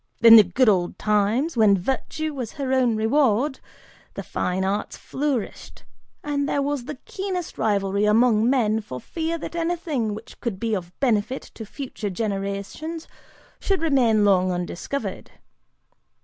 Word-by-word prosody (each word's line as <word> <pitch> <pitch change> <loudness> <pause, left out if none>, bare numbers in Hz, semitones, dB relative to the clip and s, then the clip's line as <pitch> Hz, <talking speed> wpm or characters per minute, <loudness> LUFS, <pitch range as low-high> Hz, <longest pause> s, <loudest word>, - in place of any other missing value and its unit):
In 230 -1 +11
the 220 - +10
good 220 +8 +1
old 180 -4 +2
times, 215 +9 +1
when 215 -4 +5
virtue 270 - -3
was 250 -5 -5
her 270 -2 -2
own 250 -3 +3
reward, 255 +3 +2 0.6
the - - -5
fine 185 +1 -2
arts 205 +2 -2
flourished, 270 -6 -4 0.4
and 285 -1 -1
there - - 0
was 285 -3 -2
the 300 0 -6
keenest 375 -3 -5
rivalry 200 -1 +1
among 225 +1 +4
men 220 -5 +2
for 130 -11 -7
fear 330 - -3
that 335 - -7
anything 330 -10 -1
which 220 +2 -12
could 225 -6 -3
be 230 -1 -1
of 180 -4 -3
benefit 250 0 0
to 220 - -9
future 250 -4 -5
generations 200 - -4 0.5
should 385 -4 -1
remain 240 -9 +3
long 185 -2 +3
undiscovered. 180 +10 -4
230 Hz, 145 wpm, -23 LUFS, 205-285 Hz, 0.6 s, In